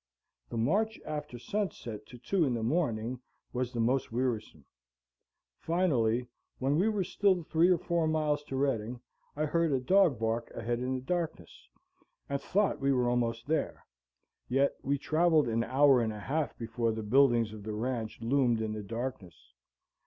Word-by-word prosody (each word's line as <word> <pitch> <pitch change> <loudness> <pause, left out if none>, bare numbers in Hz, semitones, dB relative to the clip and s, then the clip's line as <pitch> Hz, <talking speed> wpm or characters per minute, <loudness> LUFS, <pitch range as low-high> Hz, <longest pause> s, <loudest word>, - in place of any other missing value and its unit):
The 115 - -4
march 205 - +1
after 150 -5 -5
sunset 120 - -4
to 125 - -11
two 165 +10 0
in 130 -5 +1
the 115 - -2
morning 120 -4 0 0.3
was 125 -1 -1
the 120 - -4
most 125 +3 +1
wearisome. 115 - -2 0.9
Finally, 125 -9 +1 0.3
when 140 +4 +1
we 205 +4 +3
were 210 -3 0
still 185 -1 +1
three 165 +3 +3
or 180 - +5
four 170 0 0
miles 155 -2 +1
to 135 - -5
Redding, 125 -3 -1 0.4
I 155 +1 0
heard 165 +1 +1
a 135 - +2
dog 180 +1 +4
bark 115 +1 -1
ahead 120 +1 -2
in 130 +1 -1
the 130 - -4
darkness, 160 - -4 0.6
and 140 0 -2
thought 205 +6 +1
we 135 0 +2
were 125 -2 +2
almost 115 -1 0
there. 160 +2 -2 0.6
Yet 135 +2 +2
we 140 +1 0
traveled 155 -1 +3
an 115 0 +1
hour 135 0 +4
and 110 -1 0
a 105 - -7
half 145 +7 -2
before 115 0 -1
the 110 0 -4
buildings 120 -1 +3
of 110 - -9
the 105 +1 -5
ranch 115 0 -3
loomed 120 -1 +2
in 110 -1 -2
the 105 - -4
darkness. 105 - -6
130 Hz, 170 wpm, -30 LUFS, 115-155 Hz, 0.9 s, or